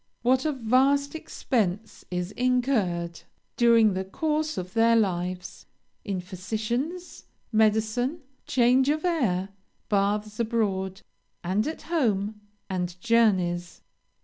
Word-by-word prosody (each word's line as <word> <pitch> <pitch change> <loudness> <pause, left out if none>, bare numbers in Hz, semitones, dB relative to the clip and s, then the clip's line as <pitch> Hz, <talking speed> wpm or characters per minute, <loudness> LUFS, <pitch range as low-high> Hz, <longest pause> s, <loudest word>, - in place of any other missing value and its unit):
What 255 +3 +3
a 310 - +2
vast 270 +3 +2
expense 220 - -2
is 180 +1 -3
incurred, 225 -10 0 0.3
during 230 -3 +5
the 190 0 -2
course 305 +9 -2
of 180 0 -5
their 230 0 +4
lives, 180 -4 -2 0.4
in 200 -4 -3
physicians, 225 - -4 0.3
medicine, 220 +7 +1 0.3
change 255 +2 +3
of 310 +3 0
air, 210 - +1 0.4
baths 210 +1 0
abroad 195 -5 -1 0.4
and 195 +7 0
at 315 - -5
home, 215 - 0 0.3
and 180 -2 -3
journeys! 185 -6 +1
220 Hz, 105 wpm, -26 LUFS, 190-255 Hz, 0.4 s, during